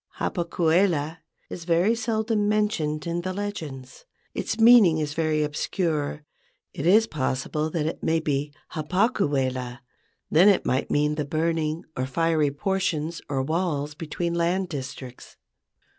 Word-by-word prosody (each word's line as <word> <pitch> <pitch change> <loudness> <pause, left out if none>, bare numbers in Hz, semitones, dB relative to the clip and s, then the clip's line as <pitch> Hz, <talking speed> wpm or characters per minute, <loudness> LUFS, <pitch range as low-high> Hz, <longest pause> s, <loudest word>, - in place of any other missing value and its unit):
Hapa 175 -2 -1
kuela 165 -2 +1 0.3
is 170 - -7
very 175 +6 +3
seldom 220 -2 0
mentioned 180 -9 0
in 170 0 -2
the 185 +1 -3
legends. 165 - -6 0.3
Its 220 - -3
meaning 225 -8 +7
is 150 -1 -2
very 155 -1 +1
obscure. 150 -1 -2 0.5
It 145 - -3
is 215 +5 +6
possible 150 - -2
that 155 -2 -2
it 160 - -3
may 160 0 +1
be 145 -2 -1 0.2
Ha 155 - -4
paku 195 - +1
wela. 130 -2 -2 0.5
Then 175 +6 +7
it 195 - +2
might 130 +2 0
mean 150 +1 +2
the 150 0 -2
burning 160 +1 -1
or 130 +1 -2
fiery 160 +1 +1
por¬ 190 +7 -2
tions 160 -2 -2
or 135 -2 0
walls 155 -1 -1
between 165 +2 -3
land 175 +2 0
districts. 130 -3 -8
160 Hz, 145 wpm, -25 LUFS, 150-185 Hz, 0.5 s, meaning